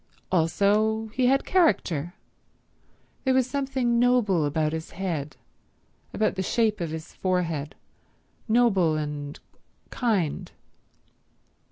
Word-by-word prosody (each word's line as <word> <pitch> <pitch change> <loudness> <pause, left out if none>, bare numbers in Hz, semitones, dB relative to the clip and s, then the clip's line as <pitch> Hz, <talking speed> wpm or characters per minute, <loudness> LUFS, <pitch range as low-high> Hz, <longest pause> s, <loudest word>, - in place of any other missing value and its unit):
Also 210 +6 +2
he 255 -1 +2
had 270 +2 +2
character; 180 - +1 1.1
there 260 -1 +2
was 260 -2 +3
something 265 -3 0
noble 235 -10 +3
about 155 +1 0
his 160 0 -5
head, 160 -6 -3 0.7
about 215 - 0
the 190 - -3
shape 215 +1 +1
of 170 - -2
his 160 +1 -7
forehead—noble 180 - -1
and 145 -1 -5 0.5
kind. 205 - -1
195 Hz, 95 wpm, -26 LUFS, 160-240 Hz, 1.1 s, was